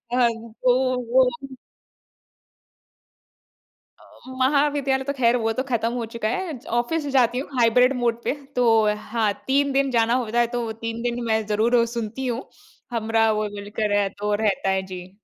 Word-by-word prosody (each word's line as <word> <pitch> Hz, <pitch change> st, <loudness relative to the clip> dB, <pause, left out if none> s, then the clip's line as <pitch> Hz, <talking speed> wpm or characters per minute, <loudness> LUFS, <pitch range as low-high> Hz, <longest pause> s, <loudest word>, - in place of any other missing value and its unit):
हाँ 245 Hz, -2 st, +4 dB, 0.3 s
तो 250 Hz, 0 st, +4 dB, 0.3 s
वो 260 Hz, -1 st, +6 dB, 2.7 s
अ, -, -, -19 dB, 0.3 s
महाविद्यालय 280 Hz, 0 st, +2 dB
तो 280 Hz, +1 st, -2 dB
खैर 245 Hz, -3 st, +2 dB
वो 225 Hz, -1 st, 0 dB
तो 260 Hz, -, -2 dB
खत्म 230 Hz, -1 st, 0 dB
हो 240 Hz, -2 st, -2 dB
चुका 230 Hz, -2 st, -2 dB
है, 320 Hz, +2 st, -3 dB, 0.2 s
ऑफिस 295 Hz, +5 st, -2 dB
जाती 245 Hz, -1 st, +3 dB
हूँ 275 Hz, -, -6 dB
हाइब्रिड 250 Hz, +3 st, +4 dB
मोड 235 Hz, 0 st, 0 dB
पे, -, -, 0 dB, 0.2 s
तो 250 Hz, -1 st, +2 dB, 0.2 s
अ, 210 Hz, 0 st, +2 dB
हाँ, 215 Hz, 0 st, -1 dB
3 280 Hz, +1 st, +2 dB
दिन 275 Hz, 0 st, +1 dB
जाना 230 Hz, 0 st, +2 dB
होता 230 Hz, +2 st, -1 dB
है, 240 Hz, -, +3 dB
तो 235 Hz, -1 st, -3 dB
3 230 Hz, 0 st, -3 dB
दिन 240 Hz, 0 st, -2 dB
मैं 220 Hz, -1 st, 0 dB
ज़रूर 220 Hz, +3 st, +2 dB
ओ 235 Hz, -1 st, +4 dB
सुनती 230 Hz, +3 st, -4 dB
हूँ। 240 Hz, +1 st, -2 dB, 0.5 s
हमराह 225 Hz, -1 st, +1 dB
वो 215 Hz, 0 st, -1 dB
बोलकर 205 Hz, +1 st, -4 dB
है, 200 Hz, -1 st, +2 dB
तो 210 Hz, +1 st, -3 dB
रहता 195 Hz, -2 st, +1 dB
है, 190 Hz, 0 st, +1 dB
जी। 180 Hz, 0 st, -8 dB
235 Hz, 170 wpm, -23 LUFS, 220-255 Hz, 2.7 s, वो